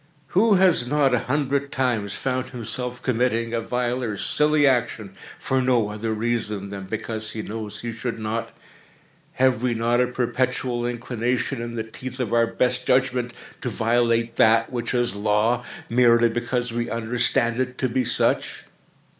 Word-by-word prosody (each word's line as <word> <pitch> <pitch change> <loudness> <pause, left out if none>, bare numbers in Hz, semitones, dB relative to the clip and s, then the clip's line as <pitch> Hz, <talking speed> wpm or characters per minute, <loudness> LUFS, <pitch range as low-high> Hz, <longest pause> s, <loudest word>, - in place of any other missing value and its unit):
Who 210 +3 +4
has 180 -9 +4
not, 140 -1 +2
a 125 - +3
hundred 140 0 0
times, 115 -6 -1
found 130 -1 -2
himself 125 0 -4
committing 115 -2 0
a 115 - 0
vile 125 +2 -1
or 110 -3 -2
a - - -6
silly 150 +4 +3
action, 120 -6 0 0.2
for 130 0 0
no 125 -4 +2
other 105 +2 -3
reason 110 -3 -2
than 100 -1 -6
because 110 +1 -3
he 110 - -4
knows 110 -1 -6
he 120 - -4
should 115 +1 -4
not? 110 +1 -3 0.8
Have 130 -3 +2
we 125 -2 0
not 120 +2 +2
a 125 - +2
perpetual 125 0 -1
inclination, 120 +1 -2
in 120 0 -5
the 110 - -2
teeth 125 +3 -8
of 120 -3 -2
our 115 0 +4
best 125 +1 0
judgment, 125 -1 +1 0.3
to 125 - -2
violate 115 0 +1
that 115 +1 +4
which 120 -1 -2
is 120 -1 +1
Law, 105 +4 +1 0.2
merely 120 -1 +4
because 120 0 -2
we 120 0 -2
understand 115 +1 0
it 130 0 -2
to 130 - 0
be 130 +1 0
such? - - 0
120 Hz, 165 wpm, -23 LUFS, 115-125 Hz, 0.8 s, Who